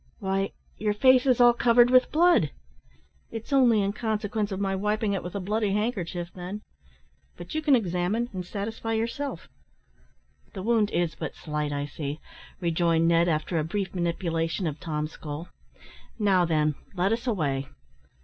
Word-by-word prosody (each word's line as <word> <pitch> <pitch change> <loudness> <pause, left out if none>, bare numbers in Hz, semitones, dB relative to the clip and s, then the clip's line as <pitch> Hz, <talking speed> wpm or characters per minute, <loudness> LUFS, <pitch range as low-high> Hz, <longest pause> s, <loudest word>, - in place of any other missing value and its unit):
"Why, 195 0 -1 0.3
your 210 -1 0
face 255 +3 +5
is 255 -2 +4
all 240 0 +7
covered 240 +1 +4
with 255 0 +5
blood!" 335 - +4 0.8
"It's 225 +5 -6
only 240 -6 +5
in 200 +1 -1
consequence 215 -2 -2
of 190 - -3
my 195 -1 0
wiping 210 +1 0
it 195 - -1
with 180 - -7
a - - -1
bloody 205 +1 0
handkerchief, 185 -5 -2
then; 190 +4 -7 0.7
but - - -9
you 310 - -1
can 295 -3 +5
examine, 195 +2 0
and 185 -1 -4
satisfy 220 +4 -4
yourself." 230 +6 -3 1.1
"The 190 -4 -6
wound 220 -2 +2
is 170 -4 0
but - - -6
slight, 150 -1 -3
I 145 0 -2
see," 145 +1 -5 0.4
rejoined 165 -1 +2
Ned, 170 +1 +4
after 160 +1 0
a - - 0
brief 190 +3 -3
manipulation 170 0 -1
of 155 -2 -3
Tom's 155 -1 -3
skull; 155 +3 -7 0.7
"now, 195 -5 +3
then, 155 -2 +1 0.2
let 190 +4 +2
us 235 +3 -3
away." 140 - 0
195 Hz, 160 wpm, -27 LUFS, 170-225 Hz, 1.1 s, all